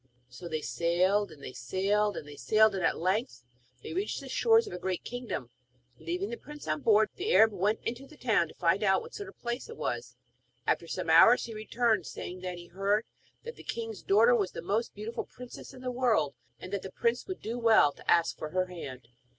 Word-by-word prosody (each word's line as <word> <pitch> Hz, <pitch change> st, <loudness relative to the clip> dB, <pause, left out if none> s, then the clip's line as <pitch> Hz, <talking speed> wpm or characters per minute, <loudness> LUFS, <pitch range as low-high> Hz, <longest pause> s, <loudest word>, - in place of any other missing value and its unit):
So 175 Hz, -, -9 dB
they 155 Hz, -2 st, -2 dB
sailed, 185 Hz, +6 st, +1 dB
and 140 Hz, -2 st, -14 dB
they -, -, -7 dB
sailed, 195 Hz, +11 st, 0 dB
and 145 Hz, -, -7 dB
they 145 Hz, -, -10 dB
sailed; 215 Hz, +7 st, +4 dB
and 190 Hz, -2 st, -2 dB
at -, -, +2 dB
length 195 Hz, -, -1 dB, 0.4 s
they -, -, -6 dB
reached 385 Hz, +4 st, -2 dB
the -, -, -9 dB
shores 455 Hz, 0 st, +4 dB
of 420 Hz, -, -8 dB
a -, -, -5 dB
great 185 Hz, -2 st, -2 dB
kingdom. 240 Hz, -, -5 dB, 0.5 s
Leaving 180 Hz, +5 st, -3 dB
the 235 Hz, -, -4 dB
prince 295 Hz, +1 st, -11 dB
on 155 Hz, -1 st, -1 dB
board, 215 Hz, -1 st, +4 dB
the 400 Hz, +5 st, -1 dB
Arab 220 Hz, 0 st, +7 dB
went 205 Hz, +3 st, 0 dB
into 245 Hz, +4 st, -4 dB
the 305 Hz, -, -16 dB
town 220 Hz, -10 st, +2 dB
to -, -, -15 dB
find 175 Hz, +3 st, +2 dB
out 190 Hz, -2 st, +3 dB
what 470 Hz, -, -12 dB
sort 405 Hz, -2 st, -6 dB
of -, -, -15 dB
a -, -, -35 dB
place 240 Hz, -, -3 dB
it 460 Hz, -, -9 dB
was. -, -, -3 dB, 0.5 s
After -, -, 0 dB
some -, -, -2 dB
hours -, -, +7 dB
he 230 Hz, -, -7 dB
returned, 220 Hz, -2 st, 0 dB
saying 180 Hz, +1 st, -7 dB
that 180 Hz, -1 st, -4 dB
he 175 Hz, -, -10 dB
heard 195 Hz, +5 st, 0 dB, 0.4 s
that 470 Hz, 0 st, -8 dB
the -, -, -11 dB
king's 225 Hz, -3 st, -5 dB
daughter 225 Hz, +5 st, +5 dB
was 205 Hz, -6 st, +1 dB
the -, -, -6 dB
most 210 Hz, +6 st, -1 dB
beautiful 215 Hz, +3 st, -4 dB
princess 250 Hz, -1 st, -11 dB
in 260 Hz, -2 st, -12 dB
the 255 Hz, -1 st, -3 dB
world, 230 Hz, -, +2 dB, 0.3 s
and 185 Hz, -, -9 dB
that 200 Hz, -, -1 dB
the 190 Hz, -, -8 dB
prince 235 Hz, +4 st, 0 dB
would 375 Hz, -1 st, -5 dB
do 235 Hz, +2 st, -4 dB
well 225 Hz, -10 st, +5 dB
to -, -, -14 dB
ask 170 Hz, -1 st, +4 dB
for 155 Hz, -, -4 dB
her 185 Hz, +3 st, +1 dB
hand. 135 Hz, -9 st, -8 dB
210 Hz, 230 wpm, -30 LUFS, 180-240 Hz, 0.5 s, Arab